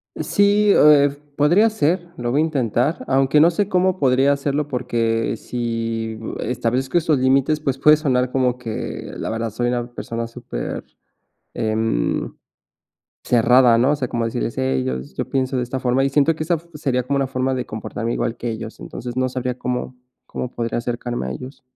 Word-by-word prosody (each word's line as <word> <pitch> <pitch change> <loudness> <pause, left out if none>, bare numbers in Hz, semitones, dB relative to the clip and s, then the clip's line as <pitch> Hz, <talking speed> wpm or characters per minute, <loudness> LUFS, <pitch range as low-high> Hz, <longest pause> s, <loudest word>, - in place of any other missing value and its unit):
Sí, 205 +1 +3
eh, 145 -2 +6 0.2
podría 175 +10 +4
ser. 175 -3 0
Lo 120 -4 -2
voy 145 +4 +2
a - - +4
intentar, 140 -1 0
aunque 135 +2 +3
no 165 +3 +6
sé 200 +4 -1
cómo 185 0 +2
podría 135 +1 +3
hacerlo, 140 +1 -1
porque 115 -4 -1
si 115 -2 -3 0.2
establezco 125 +4 -1
estos 155 -4 +2
límites, 135 +4 +2
pues 135 -3 -1
puede 150 +3 +6
sonar 130 -5 0
como 125 -2 +1
que, 115 -3 -6
la - - -4
verdad, 115 0 -2
soy 120 +3 -1
una 120 -1 -1
persona 115 -1 -4
súper, - - -6 0.7
em, 110 +1 -1 0.9
cerrada, 120 0 +5
¿no? 125 +5 +3
O - - +2
sea, 135 -3 -3
como 120 -1 -2
decirles: - - -3
"Hey, 65 0 0
yo 65 0 -1
s 65 +1 -10
yo - - -4
pienso 130 0 0
de 125 - 0
esta 125 +2 -4
forma", 125 +1 +1
y 135 - +2
siento 145 +3 +3
que 155 - -3
esa 170 +2 +1
f 165 +1 -10
sería 135 -4 -1
como 140 +3 -1
una 135 -1 0
forma 130 0 -1
de 125 -1 -2
comportarme 115 +2 -4
igual 115 - -1
que 120 - -3
ellos. 110 0 -6
Entonces 120 0 -7
no 130 0 +1
sabría 125 -1 -3
cómo 125 0 -3 0.3
cómo 125 - -5
podría 115 -2 -3
acercarme 120 - -3
a - - -3
ellos. 130 - -8
130 Hz, 190 wpm, -21 LUFS, 115-145 Hz, 0.9 s, eh